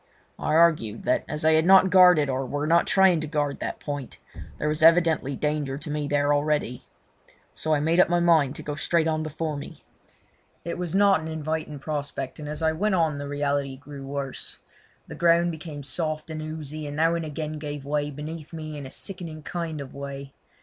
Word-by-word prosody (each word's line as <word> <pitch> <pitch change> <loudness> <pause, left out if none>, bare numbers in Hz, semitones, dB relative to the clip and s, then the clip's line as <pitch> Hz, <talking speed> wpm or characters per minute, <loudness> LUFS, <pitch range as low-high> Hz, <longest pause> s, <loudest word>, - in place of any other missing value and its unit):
I - - 0
argued 155 -10 +3
that 125 - +1
as 150 +1 -4
they 160 0 +5
had 160 +1 +3
not 190 -1 +7
guarded 180 -6 +7
or 135 0 -1
were 145 +3 -2
not 170 +2 +3
trying 190 -4 +4
to 155 - -4
guard 145 -2 -1
that - - -4
point, 145 -3 -6 0.4
there 150 - -2
was 150 0 0
evidently 165 -4 +4
danger 150 -2 -1
to 150 +1 -6
me 150 -1 -2
there 145 0 +2
already. 145 -4 -1 0.7
So 155 -1 0
I 145 - 0
made 165 +3 +2
up 185 - +6
my 175 0 +3
mind 160 -5 +3
to - - -7
go 150 - -4
straight 160 +2 +1
on 155 -1 0
before 155 0 -3
me. 145 - -9 0.8
It 170 - -4
was 180 -1 -3
not 200 -2 +5
an 160 - -6
inviting 155 -1 -3
prospect, 145 -2 -4
and 150 -1 -6
as 155 +2 -4
I 160 - +3
went 195 +5 0
on 160 -4 +1
the 145 - -5
reality 140 -1 -1
grew 145 0 -10
worse. 135 -1 -4 0.5
The - - -9
ground 170 0 +3
became 155 -3 -7
soft 155 +3 -3
and 155 0 -4
oozy, 155 -1 -6
and 145 - -6
now 165 +2 +3
and 170 -1 -1
again 155 0 -5
gave 145 -2 -6
way 145 0 -1
beneath 150 +2 -7
me 155 -2 -6
in 140 - -7
a - - -10
sickening 165 -2 -7
kind 165 -3 -4
of 140 -2 -8
way. 140 0 -7
155 Hz, 205 wpm, -25 LUFS, 145-165 Hz, 0.8 s, not